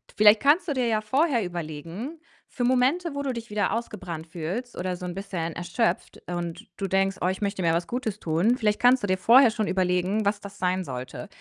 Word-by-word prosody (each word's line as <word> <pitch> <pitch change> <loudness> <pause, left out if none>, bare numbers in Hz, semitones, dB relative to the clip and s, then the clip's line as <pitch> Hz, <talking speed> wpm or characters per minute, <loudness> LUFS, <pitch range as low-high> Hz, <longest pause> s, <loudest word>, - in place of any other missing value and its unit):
Vielleicht 210 0 +7
kannst 320 +5 +3
du - - +1
dir 250 -3 0
ja 215 -1 +1
vorher 260 +1 +1
überlegen, 175 - -6 0.3
für 245 - -3
Momente, 265 +7 +2
wo 280 0 -3
du 265 -2 -1
dich 235 -1 -7
wieder 210 -2 0
ausgebrannt 185 -8 -5
fühlst 180 +10 -5
oder 180 0 -2
so 180 - -7
'n 175 - -4
bisschen 180 -4 -4
erschöpft, 175 +7 -2
und 175 -1 -5
du 195 - -2
denkst: 195 0 +1
„Oh, 180 - +2
ich 190 +2 -2
möchte 200 -1 -1
mir 165 -2 +2
was 170 0 -1
Gutes 220 -4 -3
tun“ 175 +10 +1
Vielleicht 210 -4 +1
kannst 245 -1 +5
du - - 0
dir 185 0 +1
vorher 235 +5 +6
schon 220 -2 -2
überlegen, 185 +3 +1
was 205 0 +1
das 200 0 -10
sein 185 0 0
sollte. 125 -1 -6
200 Hz, 215 wpm, -26 LUFS, 180-240 Hz, 0.3 s, Vielleicht